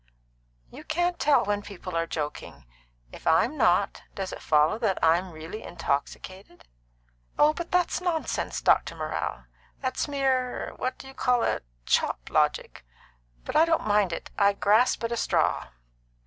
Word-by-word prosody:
"You - - -11
can't 350 +2 -1
tell 290 -1 +3
when 205 0 0
people 190 -3 -8
are 165 0 0
joking. 145 - -5 0.5
If - - -10
I'm 240 - +3
not, 200 -7 +2
does 190 -1 -4
it - - -8
follow 155 +7 +3
that 215 -5 0
I'm 170 +3 +3
really 160 +6 -8
intoxicated?" 175 +4 -5 0.7
"Oh, 300 +1 +5
but 345 +1 -6
that's 360 0 +1
nonsense, 345 -3 -2
Dr. - - +3
Morrell. - - -4 0.4
That's 260 +1 -2
mere 265 -3 -1
what 255 - -3
do 265 - -11
you 270 - -11
call 250 -2 +1
it? - - 0 0.2
chop - - 0
logic. - - 0 0.6
But - - -5
I 315 - +7
don't 330 -1 +1
mind 205 -3 +2
it. 165 - -6
I 200 0 +5
grasp 215 +5 +3
at 230 - -1
a 235 - -1
straw." - - +1
210 Hz, 155 wpm, -27 LUFS, 175-270 Hz, 0.7 s, I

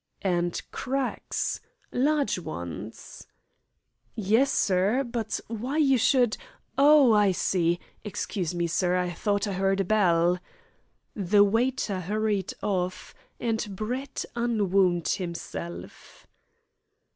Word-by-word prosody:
"And 175 -2 0
cracks 265 0 -2 0.3
large 285 -4 +1
ones?" 85 - -8 0.9
"Yes, 220 +6 +2
sir. 200 +7 +2
But 235 -3 -3
why 240 +6 -4
you 270 -5 +4
should 250 -1 +3 0.4
oh, 285 -4 +6
I 205 -2 +4
see! 175 -1 +1 0.2
Excuse 190 -4 -3
me, 170 0 0
sir; 180 +2 +1
I 180 -1 -1
thought 205 +2 0
I 190 -2 -3
'eard 195 0 +2
a - - -1
bell." 180 -3 +3 0.8
The 205 0 +4
waiter 225 -1 0
hurried 205 +1 -1
off, 185 -2 -2 0.3
and 225 -2 0
Brett 250 +7 -4
unwound 195 -7 +2
himself. 170 -1 -6
205 Hz, 105 wpm, -27 LUFS, 180-240 Hz, 0.9 s, oh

